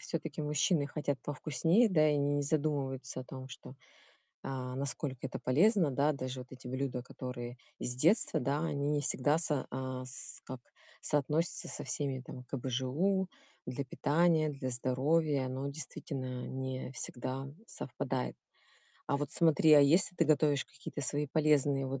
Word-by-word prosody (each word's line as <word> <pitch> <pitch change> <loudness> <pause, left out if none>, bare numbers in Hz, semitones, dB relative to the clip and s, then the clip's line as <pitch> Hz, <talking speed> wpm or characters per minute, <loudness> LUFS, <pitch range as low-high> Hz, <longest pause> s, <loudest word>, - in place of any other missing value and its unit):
всё-таки 160 -2 -4
мужчины 150 +1 +2
хотят 145 -1 -2
повкуснее, 160 - +2
да, 155 -4 +5
и 150 - +3
они 145 0 +1
не 145 - +1
задумываются 140 -4 -1
о - - -8
том, 130 0 -8
что, 125 +1 -10 0.7
а, 130 -1 -4
насколько 135 -1 -2
это - - -5
полезно, 170 - +4
да. 145 +3 +2
Даже 130 -2 -4
вот 125 +1 -11
эти 130 0 -11
блюда, 130 -1 -2
которые 125 -1 -6 0.2
с 125 - -1
детства, 170 - +4
да, 140 +4 0
они 145 -3 -1
не 150 -1 +2
всегда 145 +3 +2
со 150 -5 0
а, 130 0 -4
с 130 0 -7
как 130 -1 -7 0.4
соотносятся 150 +3 0
со - - -4
всеми 135 -3 -2
там 125 0 -9
КБЖУ. 135 +10 0 0.4
Для 140 +2 -3
питания, 155 +4 +2
для 135 -2 -4
здоровья, 135 +3 +1
оно 130 +2 -3
действительно 130 -3 -5
не 130 -1 -4
всегда 130 +1 -4 0.2
совпадает. - - -3 0.7
А - - +1
вот 145 0 -3
смотри, 160 -1 +5
а 145 - +10
если 165 +6 +4
ты 165 - +4
готовишь 150 -2 +3
какие-то 140 +1 -8
свои 145 +3 -1
полезные 145 -3 +3
вот 135 0 -3
140 Hz, 155 wpm, -33 LUFS, 130-150 Hz, 0.7 s, а